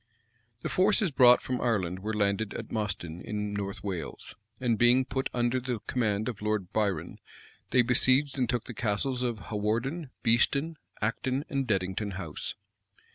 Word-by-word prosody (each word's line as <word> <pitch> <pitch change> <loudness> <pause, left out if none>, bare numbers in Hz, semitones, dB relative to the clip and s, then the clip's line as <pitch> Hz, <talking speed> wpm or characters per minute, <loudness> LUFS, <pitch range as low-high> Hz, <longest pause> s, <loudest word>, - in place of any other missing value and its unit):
The - - -1
forces 195 -1 +3
brought 125 -3 +6
from 130 -1 -2
Ireland 95 -7 0
were 105 +3 -3
landed 100 0 0
at 115 - -6
Mostyne, 90 -6 -3
in 105 -1 -3
North 100 -1 -4
Wales; 95 -4 -5 0.2
and 120 -3 +2
being 120 +4 +5
put 130 +1 -2
under 120 +1 +1
the 125 -1 -2
command 110 -4 0
of 115 -5 -4
Lord 105 -4 -1
Biron, 100 -6 -1 0.5
they 125 - +5
besieged 130 +3 +3
and 125 -4 0
took 120 -2 0
the 120 - -8
Castles 120 +4 -1
of 120 -3 -1
Hawarden, 120 +9 -1
Beeston, 140 +7 +2 0.3
Acton, 130 +5 -1
and 135 -3 -1
Deddington 100 0 -1
House. 90 -5 -5
115 Hz, 155 wpm, -29 LUFS, 105-130 Hz, 0.5 s, brought